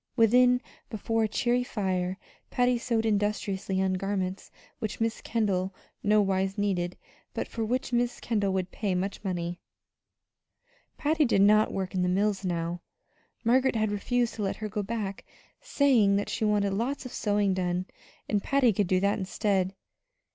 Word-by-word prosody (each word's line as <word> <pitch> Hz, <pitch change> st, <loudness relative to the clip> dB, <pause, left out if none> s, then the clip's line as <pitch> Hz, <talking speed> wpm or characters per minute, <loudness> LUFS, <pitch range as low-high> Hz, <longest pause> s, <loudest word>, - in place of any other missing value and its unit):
Within, 250 Hz, +2 st, +5 dB, 0.3 s
before 225 Hz, +1 st, 0 dB
a -, -, 0 dB
cheery 245 Hz, +3 st, +1 dB
fire, 185 Hz, -5 st, -2 dB, 0.3 s
Patty 245 Hz, -1 st, +2 dB
sewed 230 Hz, -2 st, 0 dB
industriously 205 Hz, -2 st, 0 dB
on 190 Hz, -1 st, +1 dB
garments 190 Hz, 0 st, -2 dB, 0.3 s
which 215 Hz, -, -4 dB
Miss 225 Hz, 0 st, -1 dB
Kendall 195 Hz, -4 st, -1 dB, 0.3 s
no 210 Hz, 0 st, +4 dB
wise 195 Hz, +1 st, 0 dB
needed, 180 Hz, -4 st, -1 dB, 0.4 s
but -, -, -2 dB
for 225 Hz, -, -4 dB
which 250 Hz, +3 st, -2 dB
Miss 240 Hz, 0 st, +1 dB
Kendall 205 Hz, -4 st, 0 dB
would 185 Hz, -1 st, -2 dB
pay 200 Hz, -4 st, -1 dB
much 195 Hz, +3 st, -3 dB
money. 175 Hz, -2 st, -3 dB, 1.4 s
Patty 310 Hz, +1 st, +2 dB
did 210 Hz, -7 st, +3 dB
not 215 Hz, +1 st, +5 dB
work 190 Hz, -1 st, -3 dB
in 185 Hz, -, 0 dB
the 180 Hz, -, +1 dB
mills 200 Hz, +1 st, +1 dB
now; 170 Hz, -1 st, -2 dB, 0.6 s
Margaret 255 Hz, +2 st, +3 dB
had 215 Hz, -1 st, +1 dB
refused 240 Hz, +3 st, 0 dB
to 220 Hz, -, -6 dB
let 195 Hz, -, -1 dB
her 215 Hz, -, -5 dB
go 210 Hz, 0 st, -2 dB
back, 205 Hz, -2 st, -4 dB, 0.4 s
saying 260 Hz, -, +3 dB
that 205 Hz, -, -1 dB
she 225 Hz, -, -1 dB
wanted 205 Hz, -2 st, +2 dB
lots 255 Hz, +7 st, -2 dB
of 255 Hz, -, -7 dB
sewing 205 Hz, -2 st, +1 dB
done, 180 Hz, -1 st, -1 dB, 0.4 s
and 205 Hz, -2 st, +1 dB
Patty 265 Hz, -3 st, +3 dB
could 200 Hz, 0 st, +1 dB
do 185 Hz, +1 st, +2 dB
that 200 Hz, +2 st, +1 dB
instead. 190 Hz, -1 st, 0 dB
205 Hz, 160 wpm, -28 LUFS, 190-230 Hz, 1.4 s, Within